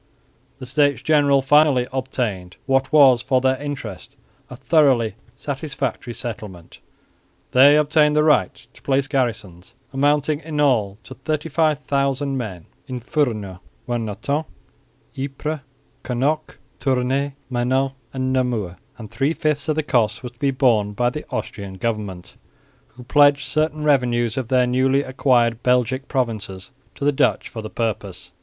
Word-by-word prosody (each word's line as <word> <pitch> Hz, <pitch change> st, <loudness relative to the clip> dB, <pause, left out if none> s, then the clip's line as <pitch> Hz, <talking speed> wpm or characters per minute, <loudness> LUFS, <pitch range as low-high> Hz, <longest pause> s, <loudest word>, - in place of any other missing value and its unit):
The 130 Hz, -, -8 dB
States 140 Hz, -1 st, +1 dB
General 145 Hz, -3 st, +3 dB
finally 145 Hz, -2 st, +4 dB
obtained 120 Hz, -9 st, -3 dB
what 135 Hz, 0 st, +1 dB
was 135 Hz, -6 st, +6 dB
for 130 Hz, 0 st, +1 dB
their 130 Hz, +1 st, +1 dB
interest 130 Hz, -4 st, -7 dB, 0.3 s
a 125 Hz, -, -8 dB
thoroughly 130 Hz, -4 st, +3 dB, 0.2 s
satisfactory 135 Hz, -4 st, -4 dB
settlement. 105 Hz, -7 st, -8 dB, 0.7 s
They 140 Hz, +3 st, +7 dB
obtained 150 Hz, 0 st, +3 dB
the 150 Hz, -, +4 dB
right 155 Hz, -1 st, +3 dB, 0.2 s
to -, -, -18 dB
place 135 Hz, 0 st, +1 dB
garrisons 110 Hz, -, -3 dB, 0.2 s
amounting 145 Hz, +2 st, +1 dB
in 155 Hz, -2 st, -5 dB
all 110 Hz, -9 st, +2 dB
to -, -, -10 dB
35,000 145 Hz, -1 st, -1 dB
men 100 Hz, -10 st, -5 dB, 0.2 s
in 125 Hz, -1 st, -5 dB
Furnes, 115 Hz, -, -2 dB, 0.3 s
Warneton, 120 Hz, +6 st, -2 dB, 0.7 s
Ypres, 140 Hz, +3 st, -4 dB, 0.4 s
Knocke, 140 Hz, +5 st, -1 dB, 0.2 s
Tournay, 135 Hz, +1 st, 0 dB, 0.2 s
Menin 130 Hz, +2 st, +1 dB, 0.2 s
and 130 Hz, -1 st, -2 dB
Namur; 115 Hz, -9 st, -1 dB, 0.2 s
and 110 Hz, -3 st, -10 dB
three 140 Hz, +4 st, 0 dB
fifths 155 Hz, -2 st, -1 dB
of 155 Hz, -, +2 dB
the 155 Hz, -, 0 dB
cost 120 Hz, -6 st, 0 dB
were 125 Hz, -, -5 dB
to 120 Hz, 0 st, -30 dB
be 140 Hz, -, +1 dB
borne 120 Hz, -6 st, +2 dB
by 120 Hz, +3 st, +1 dB
the 150 Hz, -, -7 dB
Austrian 100 Hz, -2 st, -5 dB
government, 105 Hz, -4 st, -4 dB, 0.6 s
who 125 Hz, -, -11 dB
pledged 145 Hz, +1 st, +4 dB
certain 155 Hz, +2 st, -1 dB
revenues 120 Hz, -5 st, +2 dB
of 130 Hz, -3 st, -3 dB
their 125 Hz, 0 st, +3 dB
newly 130 Hz, +3 st, +2 dB
acquired 125 Hz, -3 st, +1 dB
Belgic 125 Hz, +2 st, +1 dB
provinces 110 Hz, -7 st, -3 dB, 0.2 s
to 140 Hz, -, -4 dB
the 145 Hz, -, +4 dB
Dutch 135 Hz, -, +1 dB
for 115 Hz, -, -7 dB
the 110 Hz, -, -7 dB
purpose. 100 Hz, -6 st, -4 dB
130 Hz, 140 wpm, -21 LUFS, 115-145 Hz, 0.7 s, They